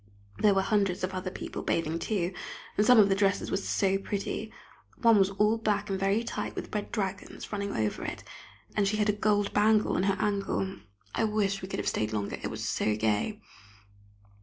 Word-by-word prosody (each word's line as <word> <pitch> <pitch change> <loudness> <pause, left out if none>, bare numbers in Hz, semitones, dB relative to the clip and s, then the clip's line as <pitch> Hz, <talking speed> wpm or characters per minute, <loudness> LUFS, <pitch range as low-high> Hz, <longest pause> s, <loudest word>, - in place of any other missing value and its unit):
There 205 -2 +4
were 195 - +3
hundreds 195 -3 +1
of 185 +1 -1
other 185 0 -3
people - - -6
bathing 165 0 -1
too, 185 -3 -1 0.4
and 210 - +3
some 250 +3 +6
of 210 -2 +8
the 195 - +3
dresses 195 0 +1
were - - +2
so 195 0 +1
pretty. 200 0 -3 0.5
One 230 -3 +6
was 195 0 +4
all 210 +3 +2
black 205 -2 0
and 190 - -1
very 195 +4 +2
tight, - - -4
with - - -6
red 210 -1 -3
dragons 195 -3 -4
running 200 -1 -3
over 110 -1 -1
it, - - -5 0.5
and 205 -2 +2
she 215 +2 0
had 210 0 +2
a - - +4
gold 205 -1 +1
bangle 215 +1 +3
on - - +2
her 195 0 +1
ankle. 200 -2 -1 0.4
I 225 - +1
wish 205 -2 0
we 185 - -5
could - - -4
have - - -3
stayed 110 0 0
longer, 105 -2 -2
it - - -3
was - - -4
so 105 - +1
gay. 110 - 0
200 Hz, 205 wpm, -29 LUFS, 190-210 Hz, 0.5 s, of